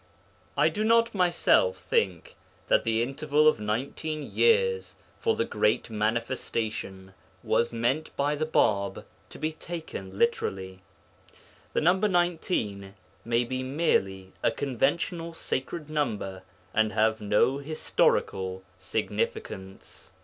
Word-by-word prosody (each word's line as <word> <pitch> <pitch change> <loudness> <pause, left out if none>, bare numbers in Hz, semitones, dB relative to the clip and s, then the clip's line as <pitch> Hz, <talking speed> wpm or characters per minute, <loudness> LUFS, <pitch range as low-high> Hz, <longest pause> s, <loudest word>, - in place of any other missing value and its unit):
I - - +5
do 215 - -2
not 230 +1 +4
myself 195 - +3
think 475 +1 -1 0.3
that - - +4
the 115 0 +2
interval 150 +4 +2
of 155 - +4
nineteen 140 +8 -3
years 470 - +2 0.2
for 450 -1 +1
the - - 0
Great - - +1
Manifestation 110 -3 -2 0.3
was 120 - +1
meant 120 +7 0
by 145 +1 +1
the 155 +1 -1
Bāb 100 -9 +1 0.3
to - - -11
be 155 +1 -1
taken 155 - -7
literally. 95 - -1 0.9
The - - +1
number 185 +6 +3
19 160 - -1 0.3
may 115 +1 +1
be 130 +2 -3
merely 95 - 0
a - - +3
conventional 165 - -1
sacred 150 +2 -3
number 110 -11 -2 0.3
and 110 -1 +2
have 110 0 +2
no 105 +6 +2
historical 95 -10 0 0.2
significance. 95 -1 -4
130 Hz, 115 wpm, -27 LUFS, 105-165 Hz, 0.9 s, I